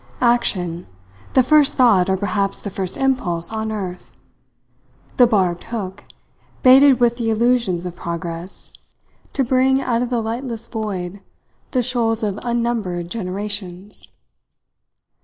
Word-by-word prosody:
Action 180 -8 +1 0.5
the 260 - +6
first 300 +1 +4
thought, 200 -8 +4
or 190 - +2
perhaps 200 0 -1
the 205 - -6
first 190 -1 -3
impulse, 210 -12 0
on 220 0 -3
earth! 185 -4 -6 1.1
The 245 - +7
barbed 185 -6 0
hook, 205 -4 -6 0.6
baited 265 +1 +7
with 240 -1 +2
the 230 -2 -1
illusions 225 -6 +1
of 180 -1 -5
progress, 170 +1 -6 0.6
to 275 - +1
bring 260 +1 +3
out 240 -3 0
of 245 - -1
the 245 -2 0
lightless 230 +1 -3
void 200 -4 -5 0.5
the 250 -2 0
shoals 230 -2 +1
of 205 -1 -2
unnumbered 230 -8 -2
generations! 200 -1 -5
220 Hz, 125 wpm, -20 LUFS, 185-240 Hz, 1.1 s, The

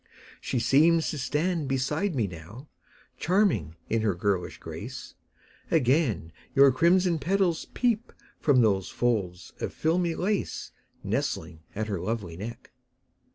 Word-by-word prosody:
She - - -2
seems 160 +7 +4
to 150 - -5
stand 155 +3 0
beside 145 +7 0
me 115 -5 +1
now, 95 - -9 0.5
Charming 185 - +1
in 115 0 0
her 105 -4 +1
girlish 95 -1 -1
grace; - - -8 0.6
Again 130 - +2 0.2
your 140 0 +7
crimson 170 +5 +3
petals 175 +2 +1
peep 235 -2 +1 0.3
From 135 -4 +4
those 100 -4 +2
folds 100 -7 -1
of - - -2
filmy 170 +1 0
lace 205 +2 -2 0.3
Nestling 80 - -2 0.2
at 110 +1 -1
her 100 -4 -3
lovely 105 -5 -3
neck. 115 +6 -8
135 Hz, 125 wpm, -27 LUFS, 105-170 Hz, 0.6 s, your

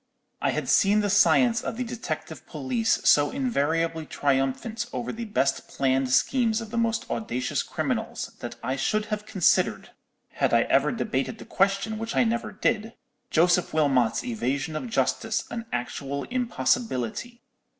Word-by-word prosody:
"I - - +2
had - - -2
seen 205 +2 +4
the 205 -1 0
science 230 +3 +4
of - - -4
the 250 - -1
detective 240 0 -6
police 235 -4 0
so 145 0 +6
invariably 165 - -1
triumphant 140 - -1
over 240 - -3
the 235 +1 -5
best 140 -11 0
planned 130 -1 0
schemes 230 - +2
of 225 -2 -8
the 235 - -3
most 230 -1 0
audacious 130 - -1
criminals, - - -3
that - - -6
I 130 +1 -1
should 210 +10 0
have 210 0 -4
considered—had 185 -4 0
I - - +5
ever - - +2
debated - - -2
the - - -11
question, 195 +3 0
which 225 0 -4
I - - +4
never 235 0 -1
did—Joseph 180 -6 0
Wilmot's 135 -7 +2
evasion 130 +6 -2
of 240 +10 -4
justice 220 0 0
an 230 -1 -5
actual 135 +3 -3
impossibility. 235 - -1
205 Hz, 145 wpm, -26 LUFS, 140-230 Hz, -, so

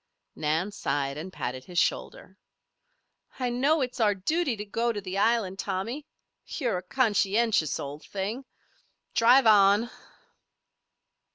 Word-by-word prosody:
Nan 160 +6 -1
sighed 140 -7 -2
and 165 +5 -7
patted 130 -5 -5
his 180 -1 -9
shoulder. - - -1 1.0
"I 250 -2 -1
know 280 +6 +2
it's 250 -1 -3
our 210 -3 +3
duty 285 - 0
to 210 - -5
go 230 +3 0
to 210 - -4
the 195 0 -4
island, 205 -4 +1
Tommy. 235 +11 -3 0.4
You're 240 - -2
a - - -9
conscientious 205 - +1
old 145 +2 -7
thing. 210 +7 -4 0.7
Drive 245 +3 +5
on." 210 +2 +5
210 Hz, 125 wpm, -27 LUFS, 185-240 Hz, 1.0 s, Drive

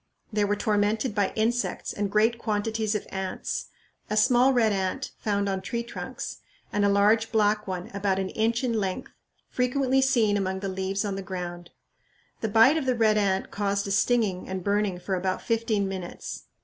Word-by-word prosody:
They 210 -1 +2
were 205 +1 +1
tormented 210 +3 +1
by 200 -2 +1
insects 235 +3 -1
and 205 -1 -2
great 220 +3 +2
quantities 220 0 -1
of 210 - -2
ants 190 -1 -3 0.4
a 215 - -1
small 245 +4 +5
red 235 -4 +3
ant 195 +7 -2
found 200 -2 0
on 190 -1 -1
tree 235 +4 -3
trunks, 235 - -6 0.4
and 205 - +2
a 200 - +4
large 210 +3 +3
black 210 -1 +2
one, 185 -1 -4
about 195 -1 0
an 190 -1 -1
inch 230 +4 0
in 245 -2 0
length, 195 -4 -2 0.4
frequently 260 +1 +1
seen 230 -6 +3
among 190 -1 -2
the 195 - -2
leaves 190 +2 -2
on 195 -1 -2
the - - -3
ground. 175 -2 -6 0.7
The 220 - -2
bite 225 +8 +6
of 285 -4 -2
the 255 - +2
red 215 -2 +3
ant 195 -2 0
caused 200 0 -1
a - - -3
stinging 205 -4 +1
and 190 -1 -4
burning 200 -2 0
for 190 +2 -4
about 185 0 -1
fifteen 225 -3 0
minutes. 185 -2 -6
205 Hz, 185 wpm, -26 LUFS, 195-225 Hz, 0.7 s, bite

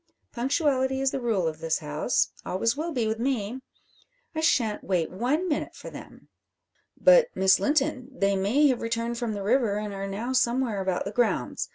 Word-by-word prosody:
Punctuality 265 0 0
is 270 -1 +1
the 270 - -3
rule 215 -8 0
of 155 -1 -4
this 165 -1 0
house 150 +8 0
always 230 +6 0
will 320 +3 -3
be 245 -7 -1
with 220 +1 -2
me. 245 -2 -1 0.7
I 315 - -3
shan't 230 -9 +1
wait 175 -4 0
one 265 - 0
minute 300 -4 -2
for - - -9
them." - - -12 0.7
"But, - - +6
Miss 190 0 +4
Linton; 285 -3 0
they 200 -6 +1
may 210 +10 +2
have 255 - 0
returned 230 +1 -2
from 230 -3 -2
the 200 - -4
river, 225 -1 +2
and 210 -1 -4
are 195 0 -4
now 220 +6 -3
somewhere 240 -4 +1
about 190 -1 -1
the 200 - -4
grounds. 210 - 0
235 Hz, 185 wpm, -26 LUFS, 195-265 Hz, 0.7 s, But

